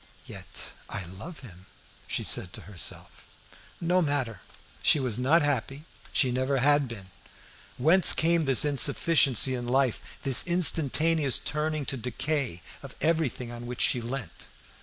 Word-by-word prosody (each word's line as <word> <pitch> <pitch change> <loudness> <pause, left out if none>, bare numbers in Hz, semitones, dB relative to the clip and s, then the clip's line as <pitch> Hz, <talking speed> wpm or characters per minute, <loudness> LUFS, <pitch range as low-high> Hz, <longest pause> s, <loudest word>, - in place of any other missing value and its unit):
"Yet - - -10 0.2
I 95 - -5
love 100 - -11
him," 95 -7 -15 0.4
she - - -2
said 90 - +2
to - - -8
herself. 100 -4 -6 0.5
No 180 +2 +1
matter! 140 - -3 0.4
She 150 - +3
was 125 -4 -2
not 145 +6 +2
happy 140 0 -3 0.3
she 130 -3 +2
never 130 +2 -1
had 145 +1 +2
been. 100 -6 -11 0.7
Whence 165 +8 +6
came 165 0 +1
this 135 +1 +3
insufficiency 140 -2 +3
in 120 -1 -5
life 130 -1 0 0.2
this 135 -3 +4
instantaneous 160 -4 +3
turning 150 0 -3
to 135 - -3
decay 125 - -4 0.2
of - - -12
everything 155 -7 -2
on 120 0 -9
which 125 0 -6
she 125 - +1
leant? 120 -4 -8
135 Hz, 140 wpm, -26 LUFS, 120-155 Hz, 0.7 s, Whence